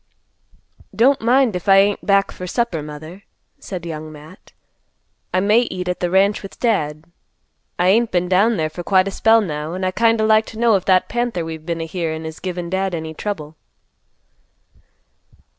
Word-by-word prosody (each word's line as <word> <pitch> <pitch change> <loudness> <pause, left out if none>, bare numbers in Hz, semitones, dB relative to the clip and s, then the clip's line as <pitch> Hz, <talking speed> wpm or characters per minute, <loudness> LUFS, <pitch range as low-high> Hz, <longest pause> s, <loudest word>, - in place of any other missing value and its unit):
"Don't 265 +4 +3
mind 240 -1 +3
if 180 +2 -4
I 195 - +8
ain't 200 +1 +3
back 200 -1 +2
for 180 - -8
supper, 235 -5 -1
Mother," 155 +5 -9 0.4
said 180 -3 -7
Young 155 -1 -6
Matt. 155 +4 -15 0.8
"I 185 - +1
may 210 +4 +4
eat 185 -7 -3
at 180 0 -2
the 175 - -1
ranch 195 +3 +2
with 195 - -11
Dad. 155 -10 -1 0.7
I 180 +1 +2
ain't 230 +4 +3
been 180 0 0
down 200 +5 +3
there 155 -1 -1
for 175 - -7
quite 185 +1 +2
a - - -3
spell 225 +3 +4
now, 155 -3 -4
an' 185 - -5
I'd 185 0 -1
kind 230 +1 +2
o' 220 - +2
like 220 0 +3
to 220 - -10
know 235 -1 +4
if 185 - -1
that 185 -1 +3
panther 240 -8 -2
we've 160 0 -8
been 165 -1 -2
a - - -3
hearin' 160 -1 -4
is 160 0 -7
givin' 180 -2 -4
Dad 190 0 -1
any 160 -1 -5
trouble." 160 -5 -6
185 Hz, 190 wpm, -20 LUFS, 165-210 Hz, 0.8 s, I